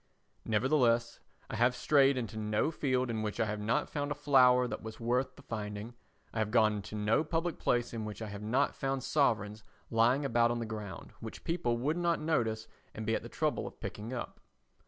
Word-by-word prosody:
Nevertheless, 115 0 +2 0.3
I - - -5
have 120 +2 +3
strayed 140 0 +4
into 115 -3 -4
no 105 +6 0
field 130 -5 0
in 110 -1 -2
which 105 -1 -3
I 115 - +3
have 105 0 -3
not 110 +4 0
found 145 -1 -3
a - - 0
flower 130 -3 +5
that - - -5
was 110 0 -8
worth 125 +3 0
the 140 - -15
finding, 105 0 -5 0.4
I 115 - -2
have 110 -1 +1
gone 110 -2 +4
into 105 +1 -7
no 105 +8 +2
public 165 +1 -2
place 120 -1 +1
in 115 -2 -3
which 105 -1 -6
I 110 -2 -5
have 100 0 -7
not 125 +7 +1
found 135 -1 -2
sovereigns 110 -7 +1 0.3
lying 120 +5 +3
about 120 -2 +3
on 120 - 0
the 115 - -3
ground 105 -3 -7
which - - -8
people 165 -9 0
would 145 +7 0
not 170 -1 +1
notice 115 -8 0 0.3
and 110 - -5
be 115 - +1
at - - 0
the - - -9
trouble - - -1
of - - -11
picking 105 +3 -6
up. 125 -2 -5
120 Hz, 210 wpm, -32 LUFS, 110-135 Hz, 0.4 s, flower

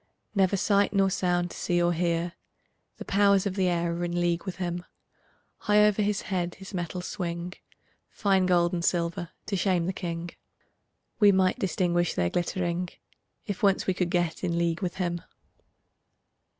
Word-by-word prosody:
Never 195 -1 +2
sight 200 +1 +2
nor 195 -1 +3
sound 175 -1 0
to - - -9
see 175 0 0
or 175 0 +2
hear; 170 0 0 0.6
The - - -8
powers 200 -1 +3
of 200 - -1
the 190 -1 +1
air 170 -1 0
are 170 +1 -3
in 175 0 -1
league 175 0 0
with 190 - -4
him; 175 -1 -3 0.7
High 210 0 +4
over 210 0 +2
his 210 0 0
head 175 -3 -2
his 195 +1 -11
metals 180 0 -4
swing, 175 -1 -4 0.6
Fine 195 -3 +2
gold 175 -1 +3
and 170 -1 -1
silver 170 -1 0 0.2
to 200 - -2
shame 180 -2 +1
the 185 - -1
king; 170 -1 -4 0.9
We 205 -2 +7
might 190 +4 +2
distinguish 175 -4 0
their 85 0 +1
glittering, 175 0 -1 0.6
If 205 -4 -4
once 195 -2 +3
we 190 - +1
could 180 -1 -1
get 175 -1 -1
in 170 -2 0
league 170 0 0
with 180 -3 -2
him. 175 -2 -2
180 Hz, 170 wpm, -27 LUFS, 175-195 Hz, 0.9 s, We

